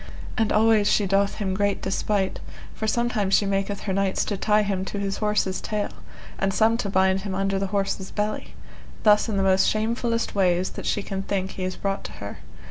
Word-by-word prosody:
And 225 -3 +1
always 215 -1 +4
she 205 - +3
doth 195 +1 +2
him 195 -3 -2
great 205 +1 0
despite, 190 0 -1 0.3
for 220 - -3
sometime 230 -3 +1
she 200 - +4
maketh 195 0 -1
her 195 - -2
knights 195 0 +1
to 205 - -2
tie 210 +2 +2
him 195 -2 -1
to 205 - -5
his 200 -1 -2
horse's 210 -3 0
tail, 210 -1 -2 0.5
and 195 0 +1
some 220 +3 +3
to 205 - -2
bind 190 0 +2
him 195 -1 -4
under 195 0 0
the 195 - -1
horse's 195 -1 -2
belly; 210 0 -3 0.5
thus 210 +1 +5
in 205 - -1
the 195 - +2
most 190 0 +4
shamefullest 230 +1 -1
ways 185 -2 +2
that - - -6
she 205 - 0
can 195 -1 -3
think 190 -1 -2
he 185 - -6
is 185 0 -2
brought 195 0 -2
to - - -6
her. - - -8
200 Hz, 210 wpm, -24 LUFS, 195-210 Hz, 0.5 s, thus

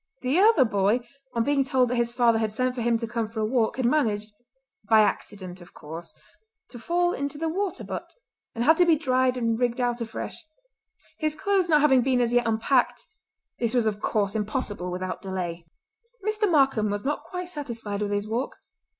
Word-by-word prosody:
The 265 +7 +2
other 415 - +6
boy, 205 +2 +2 0.3
on 230 - +2
being 280 +1 +2
told 260 -2 +2
that 250 - 0
his 235 -1 +1
father 235 -2 +3
had 220 -1 0
sent 255 +3 0
for 250 - -4
him 235 0 +2
to 230 0 -4
come 230 -2 -2
for 225 0 -6
a 215 - +1
walk, 230 0 +1
had 260 - 0
managed—by 225 -2 0
accident, 195 -3 -1
of 175 - -15
course—to 240 - -12
fall 350 +8 +1
into 280 +1 -4
the 325 +2 -2
water 380 +4 -2
butt, - - -7 0.4
and 230 - -1
had 315 +5 +5
to 355 - +5
be 330 - +6
dried 255 -3 +1
and 230 -2 0
rigged 245 0 0
out 240 -1 0
afresh. 225 +7 -5 0.8
His 310 -1 -1
clothes 390 0 +1
not 300 -2 +5
having 265 -4 +5
been 255 0 +2
as 240 -1 +1
yet 245 -1 +3
unpacked 235 - +1 0.5
this 235 0 0
was 240 -2 +3
of 210 -1 -1
course 200 -2 0
impossible 210 -3 -3
without 185 +1 -4
delay. 175 -3 -5 0.6
Mr. 430 -1 +1
Markam 270 -9 +3
was 205 +2 -3
not 295 +2 -1
quite 360 -1 -6
satisfied 235 - -5
with 205 - -1
his 205 +1 -1
walk. 235 +5 -2
240 Hz, 195 wpm, -26 LUFS, 215-280 Hz, 0.8 s, other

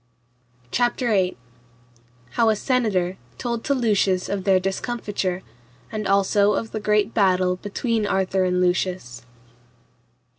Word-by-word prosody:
CHAPTER 245 0 +1
VIII. 190 - +1 0.9
How 230 -1 +3
a 215 - +3
senator 205 -7 0 0.2
told 235 -2 -3
to 280 - +2
Lucius 200 -6 +1
of 195 -2 -3
their 190 -2 +4
discomfiture, 195 -2 -3 0.5
and 215 -2 -3
also 200 +1 +3
of 225 - -3
the 220 - -3
great 210 +1 +1
battle 185 -3 +2
between 215 +2 -1
Arthur 190 -1 +1
and 180 0 +1
Lucius. 180 -9 -1
200 Hz, 120 wpm, -23 LUFS, 185-225 Hz, 0.9 s, their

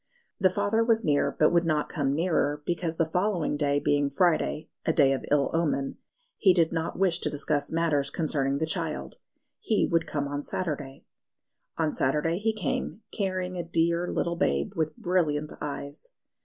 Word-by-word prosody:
The 190 -1 +5
father 205 +4 +1
was 225 -2 +2
near, 145 -2 +2
but 155 - +4
would 170 0 +3
not 155 -3 0
come 140 -4 -1
nearer 150 -3 0
because 170 -1 -1
the 165 - +3
following 180 -1 0
day 145 -1 +1
being 145 0 +1
Friday 160 0 +1 0.2
(a - - +2
day 140 -4 +4
of 135 - -3
ill 145 -1 +2
omen), 150 -5 0 0.4
he 190 -4 +5
did 165 -3 +3
not 165 0 -2
wish 185 -3 +2
to - - -1
discuss 145 0 -1
matters 160 -4 +1
concerning 140 -4 -1
the 160 - 0
child; 160 - -3 0.4
he 220 - +1
would 165 -1 +1
come 145 -2 -2
on 145 0 -3
Saturday. 145 -5 -4 0.7
On 160 -2 0
Saturday 150 +6 +1
he 220 +2 +1
came, 210 +1 -3
carrying 185 -2 -2
a 175 - -2
dear 170 +1 +1
little 170 -1 -1
babe 190 +3 0
with 155 -2 -1
brilliant 155 -4 0
eyes. 140 - -6
160 Hz, 170 wpm, -27 LUFS, 145-180 Hz, 0.7 s, The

